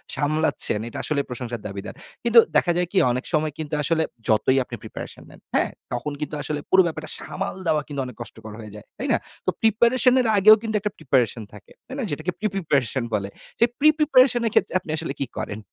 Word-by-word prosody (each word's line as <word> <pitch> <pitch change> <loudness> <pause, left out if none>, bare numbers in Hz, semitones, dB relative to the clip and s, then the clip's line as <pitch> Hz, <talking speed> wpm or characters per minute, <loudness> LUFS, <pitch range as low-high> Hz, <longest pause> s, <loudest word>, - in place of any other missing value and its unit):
সামলাচ্ছেন 150 -7 0
এইটা - - -8
আসলে 150 -2 0
প্রশংসার 120 -2 -5
দাবীদার। 100 -1 -7 0.3
কিন্তু 235 0 +7 0.2
দেখা 175 - +4
যায় 180 -1 +1
কি? 195 - -2
অনেক 125 +2 -2
সময় 155 0 +1
কিন্তু 155 -1 -6
আসলে 160 +1 +2 0.2
যতই 115 +5 +3
আপনি - - -8
প্রিপারেশন - - -8
নেন, - - -15 0.2
হ্যাঁ? - - +2 0.2
তখন 145 +5 -3
কিন্তু 150 0 -4
আসলে 150 +1 -3
পুরো 190 - +7
ব্যাপারটা 155 -1 -5
সামাল 195 0 -5
দেওয়া 150 -1 +2
কিন্তু 140 -2 -3
অনেক 125 - -9
কষ্টকর 110 -2 -9
হয়ে 110 -2 -9
যায়, 105 - -11
তাই - - -3
না? - - +4 0.3
তো - - +2
প্রিপারেশন 235 +3 +4
এর 240 - 0
আগেও 215 +2 +9
কিন্তু 220 -1 -3
একটা 210 0 -3
প্রিপারেশন 125 -6 +1
থাকে, 105 - -14 0.2
তাইনা? 265 0 -4
যেটাকে 155 +5 -2
প্রি-প্রিপারেশন 145 - 0
বলে। 100 -2 -1 0.3
সেই 235 - +4
প্রি-প্রিপারেশন 280 -5 +4
এর 225 - +1
ক্ষেত্রে - - +2
আপনি 165 -4 -8
আসলে 160 -3 -3
কি 140 - 0
করেন? 100 - -4
155 Hz, 200 wpm, -23 LUFS, -, 0.3 s, আগেও